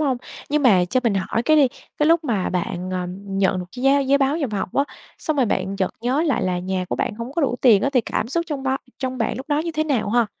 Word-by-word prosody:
hông? 275 -4 +1 0.3
Nhưng 300 0 +2
mà 195 -9 +5
cho 250 +9 0
mình 225 -4 +2
hỏi 195 +4 -1
cái 310 +5 +4
đi, 280 -3 +5 0.3
cái 300 - +3
lúc 330 0 +4
mà 215 -9 0
bạn, 180 0 -3
ờ, 180 -1 -2
nhận 195 -1 0
được 180 - -4
cái 250 - -5
giá 275 +1 +5
giấy 275 +1 +3
báo 275 +2 +2
nhập 285 -8 -2
học 200 - -2
á, 280 - +3 0.3
xong 310 - -2
rồi 260 -4 +3
bạn 190 -1 -1
chợt 190 -1 0
nhớ 255 +6 +1
lại 290 -8 +1
là 180 -1 0
nhà 185 +1 -2
của - - -2
bạn - - -1
hông 230 +4 -6
có 320 +1 0
đủ 245 -3 +1
tiền 220 -6 +6
á 275 - +1
thì 250 - +4
cảm 230 0 -3
xúc 335 +5 -1
trong 290 -4 -4
bao 265 0 0 0.2
trong 260 -1 -3
bạn 225 -1 -1
lúc 265 - -8
đó 295 -1 +2
như 330 +2 -2
thế 310 0 0
nào 260 -9 0
ha? 235 0 +3
250 Hz, 290 wpm, -22 LUFS, 195-280 Hz, 0.3 s, tiền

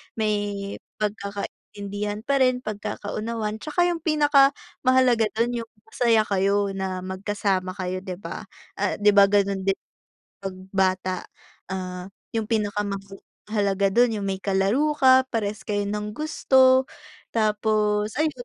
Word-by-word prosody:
may 205 -2 -2 0.2
pagkakaintindihan 205 0 -4
pa 275 +4 +1
rin 255 -1 +3
pagkakaunawan 215 +1 -4
tsaka 350 +7 +1
yung 345 - -1
pinakamahalaga 275 -5 +3
dun 235 +2 0
yung - - -38 0.2
masaya 230 -2 +3
kayo 200 0 +1
na 185 -1 -3
magkasama 190 0 -2
kayo, 185 -1 -3
'di 185 -1 -6
ba? - - -7 0.3
Ah, - - 0
'di 210 - +6
ba 200 -1 +7
gano'n 195 -1 +1
din 195 0 +2 0.7
pag 195 -1 -5 0.2
bata, 185 -1 +1 0.5
ah, 185 -1 -5 0.2
yung 220 -2 -2
pinakamahalaga 200 -1 -2
do'n 235 -1 +3
yung 200 - -3
may 190 0 -2
kalaro 210 +11 +1
ka, 260 -1 +5
parehas 215 -3 -2
kayo 205 -1 -2
ng 210 +1 -4
gusto 265 -3 +4 0.5
tapos 210 -1 +1
ayun 310 +1 +2
210 Hz, 125 wpm, -24 LUFS, 195-235 Hz, 0.7 s, ba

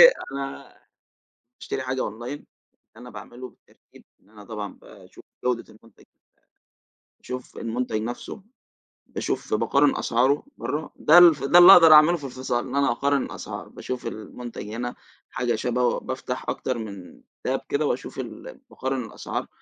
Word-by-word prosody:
بُصّي - - +12 0.2
أنا 135 0 -7 0.8
باشتري 130 - -4
حاجة 130 0 -3
أونلاين 120 +4 -4
اللي - - -18 0.5
أنا 125 +1 -11
باعمله 125 +1 -10
بالترتيب - - -23 0.2
إن 100 - -28
أنا 105 -1 -14
طبعًا 105 -2 -6
باشوف - - -16 0.2
جودة 125 -2 0
المنتج 110 0 -20
بت - - -55 1.1
باشوف 125 0 -8
المنتج 115 -1 -2
نفسه، 120 - -6 0.6
باشوف - - -4
باقارن 140 0 +3
أسعاره 130 +5 +1
برّه، 150 +2 -4
ده 160 - +5
ال 175 -1 +10 0.2
ده 175 - +9
اللي 180 +2 +11
أقدر 165 -2 +9
أعمله 155 +3 +7
في 150 - -14
الفصال 130 -1 -3
إن 130 - -6
أنا 140 -3 +3
أقارن 140 +3 +1
الأسعار، - - -7
باشوف 125 -2 -6
المنتج 115 +1 -8
هنا 120 +3 -4 0.3
حاجة 120 -2 -1
شبهه 125 +2 0
بافتح 130 -1 -5
أكتر 130 -2 -2
من 100 -5 -9 0.2
تاب - - -1
كده - - 0
وأشوف - - -3
ال - - -8
باقارن 130 -1 -3
الأسعار، 110 - -5
125 Hz, 150 wpm, -24 LUFS, 115-140 Hz, 1.1 s, بُصّي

